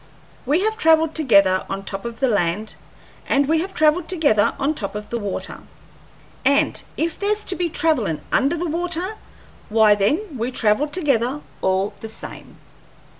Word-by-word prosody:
We 300 Hz, +6 st, +2 dB
have 440 Hz, +1 st, 0 dB
travelled 320 Hz, -2 st, +4 dB
together 200 Hz, -, +4 dB
on 195 Hz, 0 st, -4 dB
top 195 Hz, +3 st, -6 dB
of 235 Hz, -1 st, -6 dB
the 265 Hz, -, +3 dB
land, 205 Hz, -1 st, 0 dB, 0.6 s
and 280 Hz, 0 st, +3 dB
we 320 Hz, +1 st, +2 dB
have 380 Hz, +1 st, -5 dB
travelled 310 Hz, +2 st, +3 dB
together 290 Hz, -, +2 dB
on 280 Hz, +2 st, 0 dB
top 205 Hz, -9 st, -5 dB
of 210 Hz, 0 st, -6 dB
the 235 Hz, -, -1 dB
water, 205 Hz, -3 st, -4 dB, 0.8 s
and 280 Hz, +1 st, +2 dB, 0.2 s
if 325 Hz, 0 st, -2 dB
there's 420 Hz, +1 st, 0 dB
to 375 Hz, -, 0 dB
be 350 Hz, -2 st, -1 dB
travellin' 280 Hz, -, +1 dB
under 280 Hz, +6 st, +2 dB
the 345 Hz, -, -2 dB
water, 350 Hz, +4 st, -2 dB, 0.6 s
why 215 Hz, -1 st, +5 dB
then 280 Hz, -, 0 dB
we 235 Hz, +2 st, -1 dB
travel 240 Hz, +3 st, +1 dB
together 290 Hz, -4 st, 0 dB, 0.2 s
all 190 Hz, +1 st, 0 dB
the 225 Hz, -, -7 dB
same. 220 Hz, -, -10 dB
280 Hz, 165 wpm, -21 LUFS, 210-325 Hz, 0.8 s, why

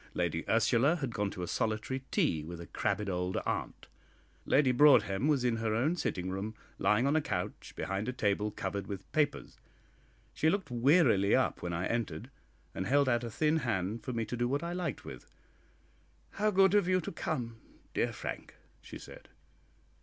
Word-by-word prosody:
Lady 85 Hz, -2 st, -1 dB
Ursula 120 Hz, +7 st, +3 dB
had 135 Hz, -8 st, -4 dB
gone 105 Hz, 0 st, -1 dB
to 90 Hz, -, -6 dB
a -, -, -3 dB
solitary 110 Hz, +7 st, -1 dB
tea 80 Hz, -2 st, +1 dB
with 85 Hz, +2 st, -7 dB
a 85 Hz, -, -7 dB
crabbed 105 Hz, +4 st, -2 dB
old 90 Hz, -1 st, -1 dB
aunt. -, -, -3 dB, 0.6 s
Lady 135 Hz, -2 st, +4 dB
Broadhem 130 Hz, -4 st, +5 dB
was 140 Hz, -5 st, +2 dB
in 120 Hz, -2 st, +2 dB
her 110 Hz, -1 st, -1 dB
own 145 Hz, +10 st, +1 dB
sitting 95 Hz, -, -2 dB
room, 100 Hz, +3 st, -4 dB, 0.2 s
lying 105 Hz, +5 st, +3 dB
on 140 Hz, +2 st, +2 dB
a 155 Hz, -, +3 dB
couch 90 Hz, -, -4 dB
behind 100 Hz, +5 st, -2 dB
a -, -, 0 dB
table 105 Hz, -4 st, 0 dB
covered 100 Hz, -2 st, -4 dB
with 100 Hz, -1 st, -7 dB
papers. 145 Hz, -2 st, -1 dB, 0.7 s
She 160 Hz, -, +2 dB
looked 190 Hz, -6 st, -1 dB
wearily 120 Hz, -, +4 dB
up -, -, +1 dB
when 90 Hz, -, -3 dB
I 85 Hz, +2 st, -2 dB
entered, 115 Hz, -, -3 dB, 0.4 s
and 95 Hz, -, -3 dB
held 140 Hz, +1 st, +3 dB
out 120 Hz, -2 st, +2 dB
a 120 Hz, -, -4 dB
thin 155 Hz, +7 st, +1 dB
hand 110 Hz, -, -2 dB
for 130 Hz, -, -4 dB
me 115 Hz, -2 st, -2 dB
to 125 Hz, -, -4 dB
do 120 Hz, 0 st, 0 dB
what 140 Hz, +5 st, -1 dB
I 170 Hz, +1 st, -3 dB
liked 175 Hz, -6 st, -3 dB
with. -, -, -9 dB, 1.0 s
"How 210 Hz, +2 st, +1 dB
good 195 Hz, -1 st, +4 dB
of 205 Hz, -3 st, +4 dB
you 185 Hz, 0 st, +3 dB
to 175 Hz, -, -5 dB
come, 115 Hz, -7 st, -4 dB, 0.3 s
dear -, -, +1 dB
Frank!" -, -, -6 dB, 0.3 s
she -, -, -9 dB
said. -, -, -13 dB
115 Hz, 185 wpm, -31 LUFS, 100-145 Hz, 1.0 s, Broadhem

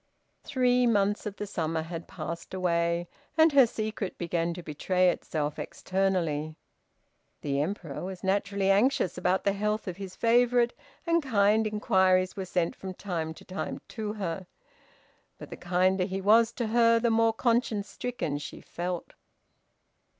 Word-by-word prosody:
Three 250 Hz, -2 st, +2 dB
months 205 Hz, -1 st, +1 dB
of 200 Hz, -, -5 dB
the 210 Hz, -, -4 dB
summer 165 Hz, -4 st, -2 dB
had 165 Hz, 0 st, -7 dB
passed 170 Hz, +2 st, -6 dB
away, 170 Hz, -1 st, 0 dB, 0.3 s
and 320 Hz, 0 st, +6 dB
her 270 Hz, -3 st, +7 dB
secret 215 Hz, -3 st, -4 dB
began 170 Hz, 0 st, -1 dB
to 175 Hz, -, -8 dB
betray 180 Hz, +4 st, +2 dB
itself 150 Hz, -3 st, -3 dB
externally. 170 Hz, -5 st, -1 dB, 0.9 s
The 140 Hz, -1 st, 0 dB
Emperor 160 Hz, -3 st, -4 dB
was 185 Hz, 0 st, -6 dB
naturally 195 Hz, 0 st, +1 dB
anxious 205 Hz, -2 st, +2 dB
about 185 Hz, +1 st, +1 dB
the 200 Hz, -, +2 dB
health 210 Hz, +1 st, -1 dB
of 180 Hz, -1 st, -4 dB
his 195 Hz, -2 st, -7 dB
favorite, 240 Hz, +1 st, +3 dB, 0.3 s
and 335 Hz, 0 st, +3 dB
kind 215 Hz, -4 st, +3 dB
inquiries 190 Hz, -3 st, +2 dB
were 190 Hz, -, -4 dB
sent 180 Hz, -2 st, -1 dB
from 190 Hz, -1 st, -7 dB
time 165 Hz, -5 st, -4 dB
to -, -, -15 dB
time 190 Hz, +1 st, -4 dB
to 215 Hz, -2 st, -4 dB
her. 185 Hz, -3 st, -4 dB, 0.9 s
But -, -, -11 dB
the -, -, -5 dB
kinder 185 Hz, +1 st, +1 dB
he 190 Hz, 0 st, -3 dB
was 225 Hz, +4 st, +5 dB
to 240 Hz, -, -2 dB
her 230 Hz, 0 st, +4 dB
the 235 Hz, 0 st, +2 dB
more 225 Hz, 0 st, +4 dB
conscience 230 Hz, -3 st, 0 dB
stricken 205 Hz, -15 st, -3 dB
she 145 Hz, -, -8 dB
felt. 175 Hz, 0 st, -5 dB
195 Hz, 150 wpm, -28 LUFS, 175-220 Hz, 0.9 s, her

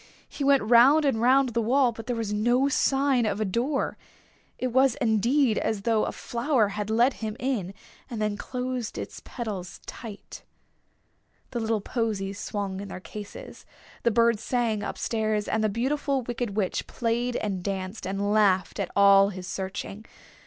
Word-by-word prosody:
He 285 Hz, -, -5 dB
went 275 Hz, -3 st, +4 dB
round 250 Hz, +7 st, +6 dB
and 225 Hz, -6 st, +1 dB
round 260 Hz, +2 st, +4 dB
the 235 Hz, 0 st, 0 dB
wall, 250 Hz, +2 st, +3 dB
but 225 Hz, 0 st, -10 dB
there 245 Hz, -, -1 dB
was 225 Hz, -3 st, -2 dB
no 240 Hz, +6 st, +2 dB
sign 270 Hz, -3 st, +2 dB
of 210 Hz, -, -1 dB
a 215 Hz, -, +1 dB
door. 245 Hz, +9 st, -1 dB, 0.6 s
It 255 Hz, -, -1 dB
was 260 Hz, 0 st, +3 dB
indeed 235 Hz, 0 st, +2 dB
as 210 Hz, -3 st, -2 dB
though 225 Hz, -1 st, +2 dB
a -, -, -2 dB
flower 235 Hz, -3 st, 0 dB
had 210 Hz, +1 st, -4 dB
let 235 Hz, +4 st, +3 dB
him 215 Hz, 0 st, -4 dB
in 220 Hz, -8 st, -2 dB, 0.3 s
and 235 Hz, -4 st, -5 dB
then 210 Hz, -1 st, 0 dB
closed 250 Hz, +1 st, -4 dB
its -, -, -6 dB
petals 205 Hz, -7 st, -6 dB
tight. 220 Hz, -4 st, -9 dB, 1.1 s
The 240 Hz, -, -2 dB
little 225 Hz, -1 st, 0 dB
posies 200 Hz, -3 st, -2 dB
swung 200 Hz, -3 st, -3 dB
in 200 Hz, -, -7 dB
their 185 Hz, -, -7 dB
cases, 205 Hz, +2 st, -9 dB, 0.4 s
the 235 Hz, -, +3 dB
bird 230 Hz, -1 st, +3 dB
sang 230 Hz, -2 st, 0 dB
up -, -, -4 dB
stairs, 215 Hz, -2 st, -1 dB
and 220 Hz, -, 0 dB
the 215 Hz, -, +2 dB
Beautiful 270 Hz, +4 st, -1 dB
Wicked 235 Hz, -3 st, -4 dB
Witch 195 Hz, -4 st, -1 dB
played 240 Hz, +1 st, -1 dB
and 195 Hz, -5 st, -2 dB
danced, 190 Hz, +1 st, -4 dB
and 200 Hz, +2 st, -1 dB
laughed 195 Hz, -4 st, +2 dB
at -, -, -1 dB
all 200 Hz, 0 st, +6 dB
his 185 Hz, -2 st, -7 dB
searching. 195 Hz, +3 st, -5 dB
225 Hz, 170 wpm, -26 LUFS, 205-250 Hz, 1.1 s, round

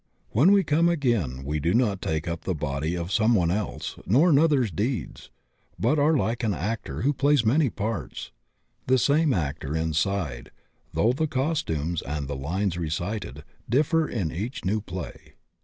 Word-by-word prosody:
When 145 Hz, -, +5 dB
we 200 Hz, -1 st, +5 dB
come 165 Hz, +2 st, +3 dB
again 115 Hz, -, 0 dB
we 75 Hz, +2 st, -1 dB
do 85 Hz, +7 st, +1 dB
not 105 Hz, -6 st, +1 dB
take 80 Hz, 0 st, -2 dB
up 85 Hz, -1 st, -3 dB
the 95 Hz, -, -2 dB
body 75 Hz, +3 st, -2 dB
of 85 Hz, +2 st, -4 dB
some 110 Hz, +3 st, +3 dB
one 85 Hz, -4 st, +2 dB
else, 105 Hz, +2 st, -3 dB
nor 145 Hz, -, +5 dB
another's 140 Hz, -, +3 dB
deeds, 110 Hz, -, -3 dB, 0.5 s
but 140 Hz, +7 st, +2 dB
are 150 Hz, +2 st, +4 dB
like 120 Hz, -1 st, -1 dB
an 105 Hz, -4 st, +1 dB
actor 110 Hz, +8 st, -3 dB
who 145 Hz, +3 st, +3 dB
plays 140 Hz, -1 st, +2 dB
many 135 Hz, +5 st, +3 dB
parts, 110 Hz, +1 st, -4 dB, 0.6 s
the 130 Hz, +1 st, +4 dB
same 145 Hz, +4 st, +3 dB
actor 75 Hz, -, -2 dB
inside 80 Hz, -4 st, -1 dB, 0.4 s
though 115 Hz, +3 st, +2 dB
the 155 Hz, +4 st, 0 dB
cos 145 Hz, +3 st, 0 dB
tumes 80 Hz, +1 st, -2 dB
and 70 Hz, 0 st, -4 dB
the 70 Hz, -, -4 dB
lines 85 Hz, +6 st, -2 dB
recited 85 Hz, -, -4 dB, 0.3 s
differ 155 Hz, +6 st, +2 dB
in 90 Hz, -9 st, -2 dB
each 110 Hz, +8 st, -5 dB
new 105 Hz, +3 st, 0 dB
play. 90 Hz, -3 st, -8 dB
105 Hz, 170 wpm, -26 LUFS, 80-135 Hz, 0.6 s, When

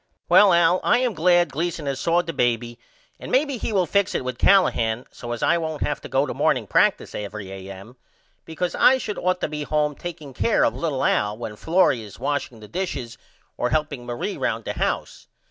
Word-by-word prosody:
Well 205 Hz, -2 st, +7 dB
Al 170 Hz, +1 st, +4 dB
I -, -, +4 dB
am 250 Hz, -2 st, 0 dB
glad 175 Hz, -2 st, +3 dB
Gleason 165 Hz, +2 st, -3 dB
has 135 Hz, -1 st, -2 dB
saw 170 Hz, +4 st, +2 dB
the 165 Hz, -, -5 dB
baby 120 Hz, -2 st, -1 dB, 0.4 s
and -, -, -8 dB
maybe 275 Hz, -2 st, +1 dB
he -, -, -3 dB
will 190 Hz, -4 st, +2 dB
fix 200 Hz, +4 st, +1 dB
it -, -, -2 dB
with 125 Hz, -1 st, -4 dB
Callahan 120 Hz, -, +3 dB
so 120 Hz, -, -8 dB
as 120 Hz, -, -4 dB
I 170 Hz, -, +3 dB
won't 160 Hz, -2 st, -3 dB
have 145 Hz, -, -2 dB
to -, -, -9 dB
go 135 Hz, +3 st, +2 dB
to 130 Hz, -, -4 dB
morning -, -, +1 dB
practice -, -, +1 dB
every 100 Hz, -1 st, -6 dB
A.M. 95 Hz, +5 st, -10 dB, 0.5 s
because 170 Hz, +2 st, -3 dB
I 260 Hz, -, +5 dB
should 215 Hz, -5 st, -5 dB
ought 185 Hz, 0 st, 0 dB
to -, -, 0 dB
be 150 Hz, 0 st, -5 dB
home 150 Hz, 0 st, 0 dB
takeing 155 Hz, -3 st, -8 dB
care 225 Hz, -, +2 dB
of -, -, +1 dB
little 150 Hz, -6 st, -2 dB
Al 105 Hz, +1 st, +1 dB
when 110 Hz, -2 st, -6 dB
Florrie 160 Hz, -, +2 dB
is 105 Hz, -3 st, -11 dB
washing 140 Hz, -5 st, -3 dB
the 105 Hz, -, -11 dB
dishes 140 Hz, -, -4 dB, 0.4 s
or 125 Hz, -, 0 dB
helping 145 Hz, -1 st, -1 dB
Marie 120 Hz, -1 st, -4 dB
round -, -, -2 dB
the -, -, -3 dB
house. -, -, -3 dB
150 Hz, 210 wpm, -23 LUFS, 120-175 Hz, 0.5 s, Well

